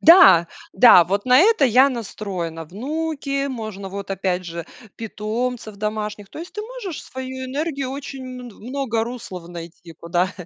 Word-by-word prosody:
Да, 320 - +9 0.3
да, 190 -4 +8
вот 200 +4 -1
на 255 +1 +7
это 395 -5 +5
я 260 +3 +6
настроена: 190 -8 -5
внуки, 275 - -2
можно 215 -6 -5
вот, 200 0 -6
опять 185 -1 -1
же, 170 -1 -5 0.3
питомцев 225 +1 -3
домашних. 210 -1 -3
То - - -9
есть 345 +2 -8
ты 420 - -3
можешь 435 -7 -6
свою 260 0 -6
энергию 275 0 -2
очень 270 -1 -6
мн 250 -1 -8 0.2
много 250 -5 0
руслов 195 -8 -7
найти, 170 0 -9
куда, 175 +4 -1
230 Hz, 150 wpm, -22 LUFS, 190-275 Hz, 0.3 s, Да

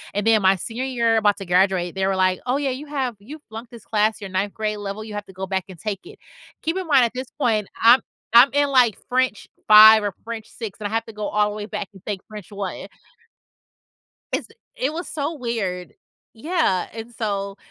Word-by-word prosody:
and 205 +1 -1
then 220 -2 +5
my 190 +1 +5
senior 230 +7 -5
year 235 -4 +1
about 205 -2 +3
to 195 - -7
graduate, 180 0 +2
they 190 0 0
were, 195 - +1
like, 185 -1 +2
"Oh 255 +3 +1
yeah, 280 -2 -1
you 285 +4 -6
have 265 -5 -2
you 290 +10 -10
flunked 225 +2 -9
this 235 -2 -13
class 215 0 +1
your 195 - -6
9th 195 +2 -1
grade 215 -1 -2
level, 205 +1 -5
you 215 -1 -9
have 205 - -5
to 190 - -13
go 190 +1 -5
back 190 -1 -2
and 180 - -10
take 210 -3 -4
it." 415 - -13 0.5
Keep 325 +4 -1
in 370 -3 -4
mind 270 -5 +5
at 230 - -3
this 255 0 -5
point, 220 -6 +1
I'm 235 +3 +7 0.3
I'm 245 +4 +8
in, 285 0 +2
like, 250 -5 +4
French 255 -4 0 0.2
5 215 0 +9
or 205 -3 -2
French 230 -1 -6
6, 220 -3 -8
and 205 - -3
I - - -9
have 225 0 -1
to 225 - -11
go 210 0 -4
all 210 0 +1
the - - -7
way 210 -1 -5
back 210 -3 -4
and 190 - -15
take 200 -3 -4
French 210 -2 -10
1. 200 -2 -5 1.5
It's - - -2 0.3
it - - -1
was 345 +2 -5
so 295 +2 -3
weird. 210 -8 -3 0.4
Yeah, 295 - 0
and 225 +1 -8
so 200 -3 -3
220 Hz, 225 wpm, -22 LUFS, 200-250 Hz, 1.5 s, 5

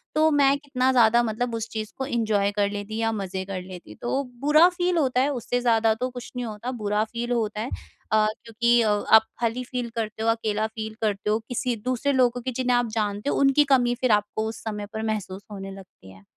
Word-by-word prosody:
तो 315 +1 +4
मैं 280 -1 +4
कितना 270 -3 0
ज़्यादा 235 -1 +5
मतलब 230 +1 -2
उस 225 0 -3
चीज़ 215 -1 -5
को 265 - -2
एन्जॉय 215 -5 +1
कर 205 0 +1
लेती 205 +1 -5
या 225 0 +1
मज़े 190 -3 -4
कर 190 -1 -5
लेती 180 -1 -11
तो 270 +3 -1 0.2
बुरा 305 +4 +6
फ़ील 355 -1 0
होता 255 -5 +2
है 280 - +2
उससे 245 0 -2
ज़्यादा 225 -2 +3
तो 250 +3 -3
कुछ 245 -1 -9
नहीं 245 -1 -3
होता 220 +3 -5
बुरा 210 -3 0
फ़ील 235 +2 -5
होता 215 -3 -1
है। 240 - -3 0.4
अ, 215 0 +4 0.2
क्योंकि 235 +1 +2
अ, 220 - +2
आप 215 +1 +5 0.2
खाली 240 +1 -1
फ़ील 250 -1 -4
करते 220 -1 -3
हो 225 - +2
अकेला 220 -1 0
फ़ील 220 0 -6
करते 210 -1 -1
हो 215 - +2
किसी 245 0 -1
दूसरे 255 +3 0
लोगों 250 -2 +2
को 255 +2 -3
जिन्हें 250 0 +1
आप 245 -1 +1
जानते 205 +5 -2
हो - - 0
उनकी 275 +1 +5
कमी 245 -2 +3
फ़िर 250 -1 0
आपको 210 +1 +1
उस 225 - -9
समय 210 -2 -4
पर 220 - -3
महसूस 205 -3 -3
होने 195 -1 -7
लगती 190 - -13
है। 95 +1 -17
225 Hz, 225 wpm, -25 LUFS, 210-250 Hz, 0.4 s, बुरा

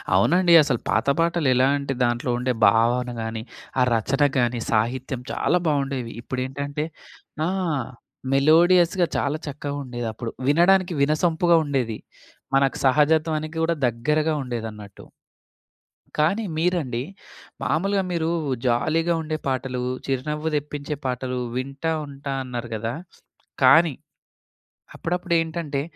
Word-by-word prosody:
అవునండి. 175 - +4
అసలు 130 -5 0
పాత - - +1
పాటలెలా 145 -7 +3
అంటే, 140 -1 -3
దాంట్లో 120 +1 0
ఉండే 125 0 0
భావన 120 +4 +2
గాని, 110 0 -4 0.4
ఆ - - +5
రచన 135 +6 -1 0.2
గాని 120 -1 +1
సాహిత్యం 125 +3 -1
చాలా 180 - +1
బావుండేవి. 135 -5 -1
ఇప్పుడేంటంటే 140 +4 -3 0.6
ఆ! - - 0 0.8
మెలోడియస్‌గా 170 +5 +4
చాలా 145 +2 0
చక్కగా 145 0 -5
ఉండేదప్పుడు. 120 -2 -5 0.2
వినడానికి 175 +4 +4
వినసంపుగా 165 +3 +3
ఉండేది. 125 -6 -1 0.6
మనకు 135 -1 +2
సహజత్వానికి 155 +3 +2
కూడా 165 0 +1
దగ్గరగా 150 +7 0
ఉండేదన్నట్టు. 110 -5 -7 1.1
కానీ 180 +9 +2
మీరండి, 160 -8 0 0.6
మాములుగా 195 +4 +1
మీరు 165 -1 0 0.4
జాలీగా 160 +8 +1
ఉండే 155 0 -3
పాటలు, 130 -1 -2 0.2
చిరునవ్వు 150 +4 -2
తెప్పించే 145 0 -4
పాటలు 125 0 -2 0.2
వింటా 140 +5 -3
ఉంటా 140 0 -6
అన్నారు 120 -2 -6
గదా! 115 +2 -3 0.7
కానీ 160 +3 +6 1.0
అప్పుడప్పుడేంటంటే, 165 -4 -1
140 Hz, 105 wpm, -23 LUFS, 125-160 Hz, 1.1 s, కానీ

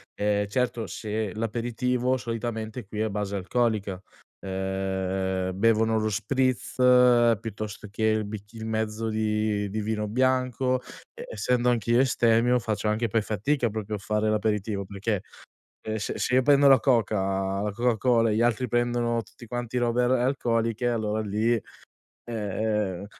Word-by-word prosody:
ehm, 105 0 0
certo 120 0 -1
se 110 -2 -4
l'aperitivo 120 +3 -1
solitamente 115 -1 -4
qui 105 +1 -4
è - - +2
a 110 - -1
base 100 -1 -3
alcolica, 100 -2 -1 0.4
ehm, 95 -1 -2
bevono 110 0 +3
lo 110 0 0
spritz 130 +3 -1 0.7
piuttosto 105 -1 -6
che 110 - -4
il 110 -1 +2
bicc 105 +1 -8
il 110 -1 -7
mezzo 110 0 -2
di 105 -1 0
di 110 +2 -3
vino 105 0 -2
bianco, 130 +1 +1 0.3
e 480 +1 -9
essendo 125 - 0
anch'io 120 0 +2
astemio, 120 -1 +3
faccio 105 0 -2
anche 110 +2 +1
poi 110 +1 +2
fatica 115 +5 0
proprio 105 0 -4
a - - -3
fare 105 +1 0
l'aperitivo, 105 -2 -1
perché, 100 0 -2 0.7
ehm, 110 0 -2
se 105 - -4
se 125 - 0
io 130 - +6
prendo 140 +1 +5
la 135 - +7
coca 95 -5 +1
la 105 - -1
coca 120 +1 +1
cola 115 -2 +3
e 105 - 0
gli - - +1
altri 120 +1 +1
prendono 120 0 +1
tutti 120 +1 -15
quanti 120 +1 -4
robe 120 0 +1
ar 120 - +1
alcoliche, 120 -2 +1
allora 110 -2 -1
lì, 110 +3 0
ehm, 115 - +1 0.8
ehm 105 -2 -2
110 Hz, 155 wpm, -26 LUFS, 105-120 Hz, 0.8 s, la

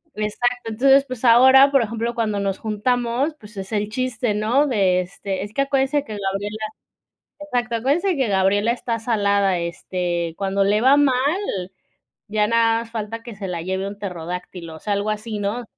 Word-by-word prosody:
Exacto, 240 +3 -2
entonces, 270 +5 +4
pues 255 -2 -7
ahora, 265 +4 +7
por 275 -3 +4
ejemplo, 230 +2 -3
cuando 215 -3 -1
nos 195 -1 -1
juntamos, 245 +6 -1
pues 210 0 -14
es 190 +2 -6
el 210 0 -1
chiste, 245 -2 -1
¿no?, 235 +8 +2
de 190 -7 +2
este: 190 +1 -5
"Es 205 +1 -9
que 275 - +1
acuérdense 275 +1 +1
que 215 -3 -6
Gabriela", 200 +2 -3 0.8
exacto: 245 -5 -2
"Acuérdense 310 - +1
que 265 -5 0
Gabriela 200 +3 +2
está 235 -1 -3
salada, 200 -4 +1
este, 170 0 -3
cuando 195 0 0
le 210 +2 +2
va 270 +3 +6
mal, 280 -3 +4 1.1
ya 210 0 +1
nada 230 0 +3
más 230 - -11
falta 225 0 -5
que 235 -3 -9
se 195 -1 -6
la 175 -2 -4
lleve 190 +2 -2
un 200 - -7
pterodáctilo", 180 -2 -6
o - - -11
sea, 205 +3 -2
algo 200 +2 -1
así, 215 0 -3
¿no? 205 +5 -2
215 Hz, 180 wpm, -21 LUFS, 200-245 Hz, 1.1 s, ahora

